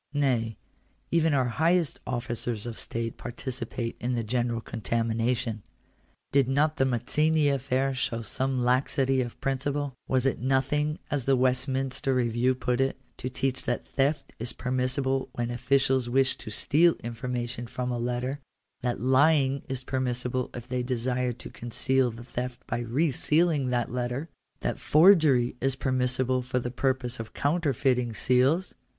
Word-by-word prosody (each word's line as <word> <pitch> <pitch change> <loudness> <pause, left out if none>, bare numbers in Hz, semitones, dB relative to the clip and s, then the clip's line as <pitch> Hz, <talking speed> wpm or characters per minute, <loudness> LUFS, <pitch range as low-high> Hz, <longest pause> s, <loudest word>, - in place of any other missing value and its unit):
Nay, 120 -6 +1 0.5
even 165 -1 +3
our 130 -2 +3
highest 160 +6 +1
officers 120 -2 -2
of 120 -2 -5
state 115 0 -4
participate 120 -1 -5
in 125 +1 -1
the 115 - -1
general 120 +1 0
contamination. 115 +1 -1 0.7
Did 140 -2 +4
not 145 +3 +2
the 135 - +3
Mazzini 150 +5 +2
affair 135 0 0
show 115 -3 -2
some 130 +4 -1
laxity 130 +1 +2
of 120 -2 -5
principle? 140 +1 -1
Was 130 -1 +1
it 135 - +1
nothing, 135 +4 +1
as 140 -4 0
the 135 - +4
Westminster 130 +1 +1
Re 120 -2 +2
view 120 +3 +2
put 125 0 0
it, 135 0 0 0.2
to 130 - -4
teach 130 +1 -2
that 120 - -2
theft 140 +2 0
is 115 +2 -3
permissible 130 +1 -1
when 120 0 -2
officials 130 0 +2
wish 135 +1 +3
to 115 - -7
steal 160 +10 +3
information 120 0 -4
from 125 +1 -3
a 120 - -2
letter 125 +3 -2 0.2
— - - -50
that 125 -1 -1
lying 135 +1 +3
is 130 -1 -3
permis 130 -2 -1
sible 125 0 -2
if 120 -1 -7
they 125 -1 -1
desire 125 0 -1
to 120 - -10
conceal 130 +2 0
the 115 +1 -9
theft 125 0 -5
by 120 - -2
re 130 +7 +1
sealing 150 -1 +2
that 120 -2 0
letter 125 +5 -2 0.2
— - - -47
that - - -2
forgery 150 -8 +5
is 135 0 +1
permissible 130 -1 0
for 125 0 -2
the 120 -1 -2
purpose 130 -1 -1
of 110 -1 -7
counterfeiting 135 -6 +1
seals 135 +11 +2
130 Hz, 155 wpm, -27 LUFS, 120-135 Hz, 0.7 s, forgery